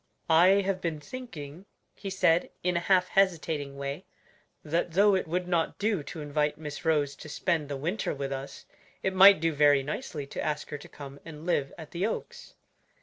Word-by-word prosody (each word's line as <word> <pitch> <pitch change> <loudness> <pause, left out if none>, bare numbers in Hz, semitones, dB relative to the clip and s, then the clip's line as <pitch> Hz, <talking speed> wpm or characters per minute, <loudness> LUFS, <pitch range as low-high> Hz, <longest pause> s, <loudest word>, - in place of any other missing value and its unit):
"I 185 +5 +6
have 190 -1 -1
been 165 -3 -2
thinking," 165 - -9 0.3
he 195 - -7
said, 175 -3 +2
in 180 0 +1
a - - +3
half 180 +1 +2
hesitating 160 -7 +1
way, 140 +5 -5 0.6
"that 165 +2 -1
though 200 +3 +5
it 185 -3 0
would 180 +2 -2
not 170 -2 0
do 210 -5 0
to 155 +2 -8
invite 150 0 0
Miss 150 -2 -7
Rose 150 -4 +1
to 155 - -10
spend 155 -1 -1
the 140 - -3
winter 175 +10 -2
with 140 0 -4
us, 135 0 -6 0.4
it 190 - 0
might 195 0 +8
do 165 0 +1
very 145 -1 +4
nicely 150 - -5
to 140 - -5
ask 150 -1 -3
her 145 - -3
to - - -13
come 140 -1 -10
and 160 -1 -10
live 145 -6 0
at 160 -3 -10
the 180 +4 0
Oaks." 475 - -6
160 Hz, 195 wpm, -28 LUFS, 145-185 Hz, 0.6 s, might